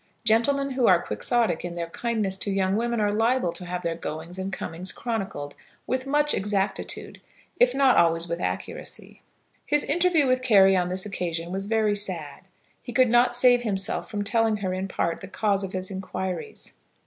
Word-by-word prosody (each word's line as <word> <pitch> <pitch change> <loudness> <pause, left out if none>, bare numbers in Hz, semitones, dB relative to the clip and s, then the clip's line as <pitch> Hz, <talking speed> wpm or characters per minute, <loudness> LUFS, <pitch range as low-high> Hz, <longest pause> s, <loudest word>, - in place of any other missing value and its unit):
Gentlemen 275 +5 +2
who 255 -2 +1
are 180 -2 +6
Quixotic 175 - 0
in 175 -1 -5
their 170 -1 -3
kindness 220 -4 -1
to 200 - -1
young 195 0 +1
women 235 +1 -1
are 205 -1 +1
liable 225 -2 +1
to 180 - -7
have 180 0 -4
their 170 -1 -1
goings 165 +2 -6
and 190 +1 -3
comings 180 -1 -3
chronicled 195 -11 -4 0.3
with 260 +1 -2
much 295 +1 +3
exactitude, 200 0 -2 0.4
if - - +4
not 270 -2 +4
always 165 0 +3
with 170 0 -3
accuracy. - - -5 0.4
His 295 0 +2
interview 340 -1 +2
with 255 0 +2
Carry 195 -6 +5
on 180 -1 +1
this 185 +2 0
occasion 170 -4 -4
was 195 +1 -1
very 215 -1 +1
sad. 185 -7 -3 0.4
He 240 - -8
could 255 +1 +4
not 240 +1 +4
save 245 0 +5
himself 195 -5 -1
from 205 -2 -3
telling 225 +1 +1
her 190 -2 -3
in 190 +1 -3
part 170 -3 -2
the 190 - -8
cause 200 0 0
of 190 - -6
his 185 +1 -2
inquiries. 190 -2 -5
200 Hz, 185 wpm, -25 LUFS, 180-240 Hz, 0.4 s, are